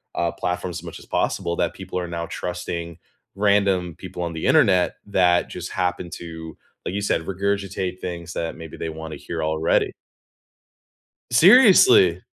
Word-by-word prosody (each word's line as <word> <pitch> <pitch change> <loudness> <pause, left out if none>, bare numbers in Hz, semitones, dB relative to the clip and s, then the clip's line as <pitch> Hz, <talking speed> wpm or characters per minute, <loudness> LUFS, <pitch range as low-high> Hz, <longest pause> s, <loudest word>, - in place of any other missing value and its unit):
uh, 85 -1 0
platforms 90 0 -3
as - - -14
much 85 - -8
as - - -15
possible 85 - -1
that 85 - 0
people 95 -1 -5
are 90 - -4
now 85 0 -4
trusting 85 -2 -5 0.4
random 100 -4 +2
people 90 - -8
on 85 - -3
the 80 - -4
Internet 90 -3 +4
that 90 -3 +2
just 90 0 -7
happen 90 -1 -2
to, 80 -1 -8 0.3
like - - -3
you 100 - -1
said, 100 - 0
regurgitate 95 -1 -2
things 85 -1 -6
that 80 -1 -3
maybe 80 -2 -10
they 80 - -4
wanna 80 0 -7
hear 80 -2 -5
already. 80 +1 +1 1.4
Seriously! 250 - +7
90 Hz, 155 wpm, -23 LUFS, 85-95 Hz, 1.4 s, Seriously